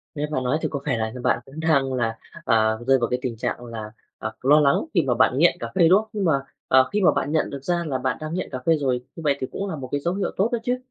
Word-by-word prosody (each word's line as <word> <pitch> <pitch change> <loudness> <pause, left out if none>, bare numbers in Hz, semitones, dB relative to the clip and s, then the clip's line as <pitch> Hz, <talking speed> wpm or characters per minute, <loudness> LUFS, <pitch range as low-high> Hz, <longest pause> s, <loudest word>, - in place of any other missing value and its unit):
Nghe 150 +1 -1
bạn 130 -3 -1
nói 130 +5 +1
thì - - 0
có 140 - -2
vẻ 130 -5 0
là 110 0 -2
như 125 - -8
bạn 115 - +2
cũng 140 +4 -10
đang 140 -5 +2
là, 115 -3 -1 0.3
à, 110 0 +3
rơi 135 0 +5
vào 120 - 0
cái 125 - -1
tình 120 -4 -4
trạng 120 +2 -3
là, 110 -2 -7 0.3
à, 110 - -4
lo 145 +4 +5
lắng 140 -2 +4 0.2
khi 170 - +4
mà 125 - +3
bạn 125 +2 +3
nghiện 175 +2 +4
cà - - -5
phê, 170 -3 +5
đúng 190 +4 +6
không? 220 - -15
Nhưng 200 -3 -1
mà, 160 - +4 0.4
à, 130 - +6
khi 205 0 0
mà 180 - +6
bạn 145 - -2
nhận 160 - +1
được 140 -1 -7
ra 175 +1 0
là 130 -3 -1
bạn 130 0 -1
đang 155 +1 -5
nghiện 185 - -3
cà 130 - -4
phê 165 -1 +4
rồi, 130 -4 0
như 165 - -8
vậy 140 -2 +2
thì 130 - -3
cũng 200 0 -4
là 160 - -3
một 130 -3 -7
cái 145 - 0
dấu 175 +3 -1
hiệu 195 - -2
tốt 205 +5 +2
đó 235 - +1
chứ. 250 +1 0
140 Hz, 320 wpm, -23 LUFS, 125-165 Hz, 0.4 s, đúng